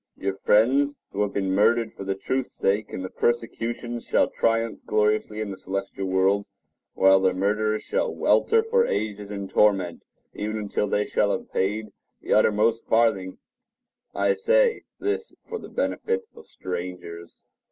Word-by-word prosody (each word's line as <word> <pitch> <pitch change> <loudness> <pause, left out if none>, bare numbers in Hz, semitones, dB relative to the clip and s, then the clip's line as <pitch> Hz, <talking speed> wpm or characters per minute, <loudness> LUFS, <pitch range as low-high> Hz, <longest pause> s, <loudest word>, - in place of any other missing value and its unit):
Your 95 0 -2
friends 130 +9 +3
who 100 - -2
have 105 -1 0
been 95 -1 -1
murdered 110 +3 +3
for - - -8
the 95 0 -2
truth's 130 +6 -2
sake 100 +2 0
in 95 - -5
the 95 - -5
persecutions 120 0 -2
shall - - +3
triumph 115 0 0
gloriously 105 0 +1
in 105 -2 -3
the 95 - -8
celestial 95 0 -4
world, 95 +2 +2 0.5
while 95 0 +6
their 95 -1 +2
murderers 105 +3 0
shall - - -1
welter 450 0 +3
for 470 +1 +2
ages 105 -1 -3
in 100 -1 -5
torment, 95 -4 +2 0.3
even 110 +1 -3
until 105 0 -1
they 105 +1 0
shall - - +1
have - - -4
paid 105 +3 -1 0.3
the - - -1
uttermost 110 +2 +3
farthing. 110 -5 +2 0.8
I - - +2
say 470 +1 +2
this 420 +3 -3
for 455 - -6
the - - -10
benefit 470 -1 -1
of 460 - -14
strangers. 90 -2 -7
105 Hz, 155 wpm, -25 LUFS, 95-120 Hz, 0.8 s, while